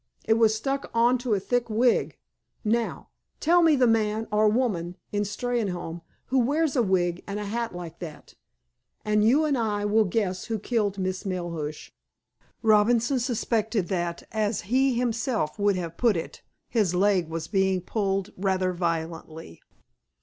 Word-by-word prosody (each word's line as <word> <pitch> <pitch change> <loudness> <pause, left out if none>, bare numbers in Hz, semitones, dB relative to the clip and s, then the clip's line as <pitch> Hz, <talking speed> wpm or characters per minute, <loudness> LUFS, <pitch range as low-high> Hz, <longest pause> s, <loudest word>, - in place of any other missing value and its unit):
It 220 - +4
was 220 -1 +4
stuck 270 +5 -2
on 240 +2 +4
to 240 -3 0
a - - 0
thick 240 +4 -1
wig. 235 +3 +2 0.5
Now, 230 +2 -1 0.3
tell 345 +3 +4
me 325 -3 +5
the 255 -2 +4
man, 220 -1 +1
or 210 +1 +4
woman, 200 -7 -1
in 205 - 0
Steynholme, 205 -6 -3 0.2
who 265 0 +1
wears 295 +5 +1
a 250 - +4
wig 180 -4 0
and 200 +1 -3
a 210 - -4
hat 230 -1 -3
like 170 -2 -8
that, 160 -4 -9 0.7
and 210 0 +2
you 275 +8 +4
and 295 -2 +1
I 210 -4 -1
will 215 +1 +3
guess 185 -1 -1
who 225 - -2
killed 210 -2 -1
Miss 185 0 -2
Melhuish." 170 -6 -4 0.7
Robinson 230 +4 +3
suspected 225 -4 -1
that, 175 -3 -2
as 215 -1 0
he 265 -1 +3
himself 235 - -1
would 200 -1 +3
have 170 -2 -5
put 230 -6 +3
it, 165 - -6 0.3
his 205 -7 +1
leg 185 -3 +2
was 160 -1 -4
being 190 -2 +1
pulled 195 0 -2
rather 185 -1 0
violently. 165 - -4
210 Hz, 155 wpm, -26 LUFS, 185-235 Hz, 0.7 s, me